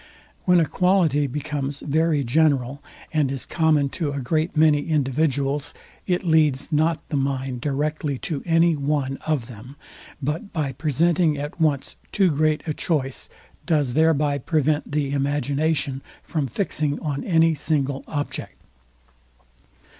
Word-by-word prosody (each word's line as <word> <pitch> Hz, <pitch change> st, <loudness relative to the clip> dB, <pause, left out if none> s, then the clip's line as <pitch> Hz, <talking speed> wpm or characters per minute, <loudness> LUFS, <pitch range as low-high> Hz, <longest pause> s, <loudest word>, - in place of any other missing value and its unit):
When 180 Hz, -1 st, +5 dB
a 165 Hz, -, +3 dB
quality 165 Hz, -5 st, +2 dB
becomes 145 Hz, 0 st, -4 dB
very 155 Hz, 0 st, +1 dB
general, 140 Hz, 0 st, +1 dB, 0.3 s
and 150 Hz, -4 st, +2 dB
is 135 Hz, -2 st, -3 dB
common 155 Hz, -4 st, +2 dB
to 150 Hz, 0 st, -3 dB
a 140 Hz, -, -3 dB
great 155 Hz, +6 st, -1 dB
many 150 Hz, -2 st, +4 dB
individuals, 145 Hz, -1 st, 0 dB, 0.3 s
it 180 Hz, -1 st, 0 dB
leads 155 Hz, -4 st, +2 dB
not 160 Hz, +1 st, +1 dB
the -, -, -2 dB
mind 135 Hz, -2 st, -2 dB
directly 145 Hz, 0 st, -1 dB
to 150 Hz, -5 st, -2 dB
any 165 Hz, -1 st, +3 dB
one 140 Hz, -2 st, -1 dB
of 150 Hz, -7 st, 0 dB
them; 125 Hz, +3 st, -11 dB, 0.4 s
but 150 Hz, -, -3 dB
by 150 Hz, -5 st, -1 dB
presenting 155 Hz, +3 st, +1 dB
at 145 Hz, +3 st, -6 dB
once 145 Hz, -4 st, 0 dB
too 190 Hz, -4 st, +3 dB
great 155 Hz, +1 st, +1 dB
a 155 Hz, -, -1 dB
choice, 140 Hz, -5 st, -2 dB, 0.4 s
does 145 Hz, -6 st, +1 dB
thereby 150 Hz, -1 st, +2 dB
prevent 150 Hz, +1 st, 0 dB
the 145 Hz, -2 st, 0 dB
imagination 140 Hz, 0 st, 0 dB, 0.2 s
from 150 Hz, -5 st, -2 dB
fixing 150 Hz, -, -1 dB
on 145 Hz, -3 st, -3 dB
any 165 Hz, -3 st, +3 dB
single 140 Hz, -2 st, -1 dB
object. 145 Hz, -1 st, -4 dB
150 Hz, 135 wpm, -23 LUFS, 140-160 Hz, 0.4 s, When